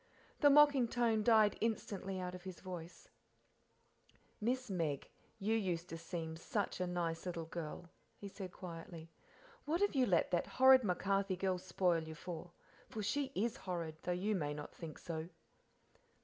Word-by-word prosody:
The 290 - +7
mocking 285 -3 +7
tone 230 -2 +2
died 215 -1 +5
instantly 200 -4 -2
out 180 0 -4
of 180 - -7
his 185 -1 -8
voice, 180 -2 -8 1.3
"Miss 250 +3 0
Meg, 165 -8 -1 0.3
you 215 +3 +1
used 180 -5 -1
to 165 - -5
seem 165 -1 -4
such 200 +5 -2
a 180 - 0
nice 170 -1 -2
little 170 -2 -3
girl," 165 +1 -6 0.3
he 200 - -7
said 190 -2 -7
quietly; 165 -2 -8 0.5
"what 320 +4 +1
have 405 +1 +2
you 260 -3 +3
let 180 -3 +3
that 175 - +1
horrid 260 0 +9
MacCarthy 195 -1 +1
girl 185 -1 0
spoil 180 -2 +1
you 160 0 -7
for? 175 +1 -7 0.4
For 215 - -4
she 270 +5 0
is 235 +5 0
horrid, 170 -6 -4
though 180 - -2
you 190 +5 0
may 150 -6 -1
not 150 0 -7
think 165 -3 -8
so." 165 -1 -5
185 Hz, 165 wpm, -37 LUFS, 170-220 Hz, 1.3 s, horrid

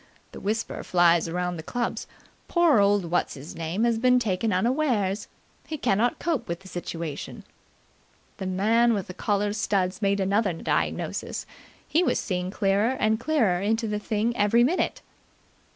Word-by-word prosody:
The - - -9
whisper 220 +3 -2
flies 170 -2 +3
around 180 +1 -2
the - - -5
clubs: 240 +9 -3 0.4
'Poor 340 - +4
old 200 -1 +3
What's 175 - 0
his 140 +2 -9
name 165 +6 -2
has 235 -1 +2
been 250 +1 +4
taken 220 -2 0
unawares. 210 -2 0 0.4
He 315 - -4
cannot 235 -2 +1
cope 335 -5 -2
with 170 +1 -4
the 190 - -14
situation!'" 170 -4 -6 0.9
The 190 - -4
man 225 +5 +3
with 195 - -3
the 185 - -8
collar 205 +1 0
studs 195 -3 -1
made 200 0 +1
another 195 0 +1
diagnosis. 165 - -2 0.4
He 325 - +2
was - - +1
seeing 180 -3 -2
clearer 205 +6 +1
and 220 0 +2
clearer 235 - +1
into 225 +3 0
the 210 0 -2
thing 220 +2 -1
every 225 +2 +4
minute. 325 +9 0
205 Hz, 155 wpm, -26 LUFS, 185-235 Hz, 0.9 s, Poor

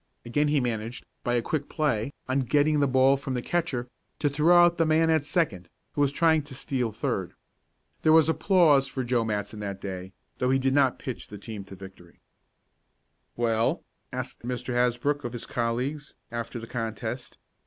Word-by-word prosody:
Again 145 +5 +1
he 150 0 +3
managed, 115 -1 -3 0.2
by 120 - +1
a 120 - +1
quick 145 +1 -2
play, 140 -5 0 0.2
on 130 +1 +1
getting 145 +3 +2
the 140 - +3
ball 130 +1 +4
from 135 -1 -4
the 125 - -1
catcher, 160 -8 -1 0.3
to 145 - 0
throw 155 +5 +5
out 175 0 +5
the 165 - +4
man 160 +1 +4
at 160 -3 +3
second, 145 - -1 0.2
who 145 - -1
was 140 -1 +3
trying 160 +1 +3
to 140 -3 -9
steal 125 -3 -2
third. - - -3 0.7
There 155 - +4
was 160 -1 +6
applause 160 -5 +4
for 130 -1 -3
Joe 120 -1 +1
Matson 105 -1 -3
that 100 -2 -4
day, 95 -1 -6 0.3
though 125 - +1
he 135 - +4
did 135 0 +1
not 135 -3 +3
pitch 130 -4 -6
the 105 - -9
team 105 0 -7
to 95 - -11
victory. 95 -2 -13 1.2
"Well?" 115 -1 +1 0.3
asked - - -5
Mr. 125 +1 -4
Hasbrook 125 +4 +1
of 120 - -4
his 120 - -5
colleagues, 125 +5 -2 0.2
after 115 +1 -4
the 115 - -6
contest. 115 -2 -5
130 Hz, 185 wpm, -27 LUFS, 115-145 Hz, 1.2 s, was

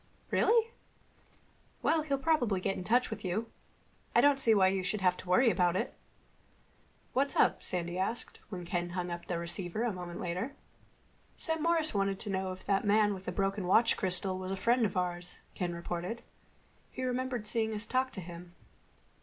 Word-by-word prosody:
Really? 460 0 +3 1.1
Well, 320 -1 +3
he'll 285 -3 0
probably 265 - +2
get 195 - -1
in - - -5
touch 245 +6 +2
with 220 - -5
you. 205 +5 -2 0.6
I - - +7
don't 285 -1 +5
see 225 -4 +4
why 190 -2 +5
you 190 0 0
should 190 +3 -2
have 180 -1 +3
to 180 - -9
worry 230 +6 +5
about 180 -3 +2
it." - - -1 1.2
"What's 275 +2 +1
up?" - - +3
Sandy 175 0 -2
asked, 225 +5 -2
when 180 -4 -6
Ken 175 0 -2
hung 180 -1 -2
up 170 0 -6
the 175 - -1
receiver 175 +4 -3
a 235 -3 0
moment 175 -1 -6
later. 185 +11 -3 0.8
"Sam 320 -1 -2
Morris 330 -1 +2
wanted 195 -1 0
to 210 - -1
know 190 0 -1
if 185 0 -9
that 195 -1 +2
man 205 0 +4
with 190 -1 -8
the - - -2
broken 195 0 -1
watch 225 +5 +5
crystal 185 -1 +1
was 185 0 -5
a - - 0
friend 235 +2 +3
of 195 - -6
ours," 180 0 -3 0.2
Ken 180 -1 -2
reported. 175 +6 -4 0.7
"He 255 - -6
remembered 255 -2 -2
seeing 220 0 0
us 210 +2 -4
talk 260 +2 +1
to 190 - -5
him." 175 0 -10
195 Hz, 185 wpm, -32 LUFS, 180-240 Hz, 1.2 s, I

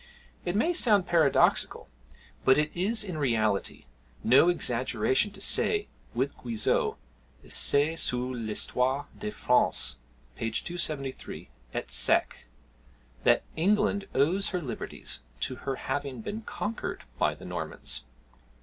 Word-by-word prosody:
It 175 - -1
may 320 +12 +2
sound 210 - +3
paradoxical, 160 -5 +2 0.6
but 130 - +5
it 150 0 +1
is 210 +5 +2
in 180 -6 -5
reality 110 - 0 0.4
no 135 +8 +5
exaggeration 130 - +1
to 205 - -10
say, 420 -1 +3 0.3
with 130 +4 -1
Guizot, 115 -3 0 0.5
[Essais 150 +3 +5
sur 125 +1 -1
l'Histoirs 125 +4 -1
de 210 - -3
France, 65 - +1 0.4
p. 115 - -3
273, 145 +1 -4 0.3
et - - -4
seq.] - - +3 0.8
that - - +4
England 200 +3 +1
owes 170 +9 +3
her 180 - -2
liberties 120 - -4 0.2
to 130 - -2
her 135 - 0
having 130 -2 -4
been 215 - -5
conquered 220 0 -5 0.2
by - - +1
the - - -13
Normans. - - -4
145 Hz, 120 wpm, -28 LUFS, 125-190 Hz, 0.8 s, but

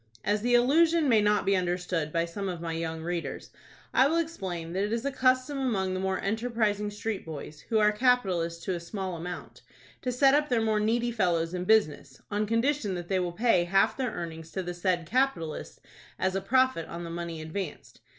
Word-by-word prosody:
As 205 0 +1
the 245 +2 +3
allusion 315 +6 +4
may 225 -4 +5
not 210 0 +2
be 195 0 +3
understood 180 -3 -1
by 165 +1 +1
some 195 +3 -4
of 175 -2 -4
my 165 -1 -4
young 160 0 -3
readers, 175 0 -4 0.4
I 260 - +5
will 325 +3 +1
explain 190 - -3
that 190 +2 0
it 210 - -2
is 230 +3 -1
a 280 - 0
custom 255 +1 +2
among 195 -8 0
the 185 - -2
more 190 0 -1
enterprising 215 -1 0
street 210 0 -4
boys, 155 -1 -8
who 225 - +2
are 210 -1 +5
capitalists 190 -8 +1
to 190 - -1
a 175 - -3
small 185 +1 -5
amount, 175 +2 -7 0.4
to 250 - -1
set 270 +2 +4
up 295 +1 +2
their 245 -2 +2
more 220 -1 +1
needy 235 +3 +1
fellows 175 -6 0
in 180 0 -3
business, 155 -10 +2
on 210 +1 0
condition 230 -2 +1
that 175 -1 -6
they 190 -1 +2
will 180 -1 -1
pay 185 -2 +2
half 195 +3 +3
their 260 -2 -1
earnings 165 -5 -7
to 190 - -2
the 175 0 -4
said 175 -1 0
capitalists 240 - -1 0.4
as 190 0 0
a 195 - 0
profit 255 -4 +2
on 170 +1 -6
the 170 - -6
money 170 -1 -5
advanced. 155 - -6
195 Hz, 210 wpm, -28 LUFS, 170-235 Hz, 0.4 s, may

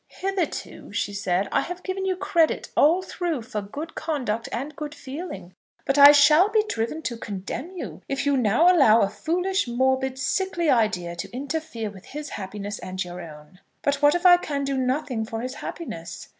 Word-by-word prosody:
"Hitherto," 385 -4 -4
she 205 - -2
said, 195 -1 0
"I - - +2
have 355 +1 -6
given 380 0 -3
you 375 - +1
credit 335 -3 +1
all 335 +6 +4
through 340 -8 -3
for 220 -3 -4
good 285 +11 -7
conduct 260 -9 -2
and 280 +4 -4
good 300 +1 -6
feeling; 265 - -7 0.3
but 275 - +1
I 285 +1 +11
shall 300 +6 +6
be 430 0 +3
driven 305 - -3
to 235 -4 -3
condemn 225 - -6
you - - -7
if 275 +1 -1
you 285 -1 +3
now 260 - +4
allow 230 -8 +6
a 195 - +2
foolish, 360 - -1
morbid, 260 +2 +1
sickly 345 +3 0
idea 195 -7 +1
to - - -6
interfere 265 -4 -4
with 190 -2 -14
his 295 +1 -7
happiness 205 +1 -6
and 185 0 -4
your 175 0 -8
own." 155 +2 -12 0.2
"But 280 0 0
what 290 +2 +5
if 350 +1 -2
I 355 -1 +9
can 285 -5 -3
do 275 0 -1
nothing 260 -2 -1
for 225 0 -5
his 255 +2 -4
happiness?" 170 - -7
275 Hz, 185 wpm, -24 LUFS, 215-325 Hz, 0.3 s, I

